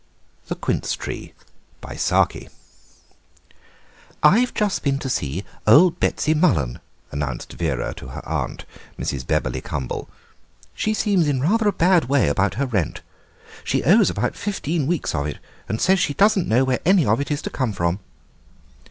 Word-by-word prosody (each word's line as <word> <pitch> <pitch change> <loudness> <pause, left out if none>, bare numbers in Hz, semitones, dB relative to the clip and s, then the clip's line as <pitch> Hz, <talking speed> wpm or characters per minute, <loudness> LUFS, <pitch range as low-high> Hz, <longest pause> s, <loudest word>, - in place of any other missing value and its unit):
THE - - -3
QUINCE - - -1
TREE - - -7 0.5
"I've - - 0 2.1
just 210 -3 0
been 135 -1 +1
to 135 - -5
see 75 - -2 0.2
old 165 +11 +6
Betsy 155 - +1
Mullen," 80 - +1 0.3
announced 70 -3 -4
Vera 75 -8 -2
to - - -9
her 65 - -9
aunt, - - -3 0.3
Mrs. 65 -3 -4
Bebberly - - -1
Cumble; 65 -5 -5 0.6
"she 215 0 -1
seems 200 -7 +2
in 140 -3 +1
rather 210 - +2
a - - +4
bad 180 -3 +3
way 135 - +2
about 95 +8 +1
her 140 - 0
rent. 100 - -2 0.6
She - - 0
owes 200 +7 +5
about - - -1
fifteen 170 -7 -2
weeks 170 -2 -1
of 70 0 -1
it, 75 - -5 0.3
and 110 - -2
says 190 0 +3
she 145 -5 0
doesn't 200 -2 +3
know 120 +4 +4
where 130 -1 0
any 185 -2 +4
of 110 +4 +2
it 140 - -4
is 145 0 -2
to - - -4
come 130 -5 -1
from." 85 -1 -1
140 Hz, 155 wpm, -22 LUFS, -, 2.1 s, old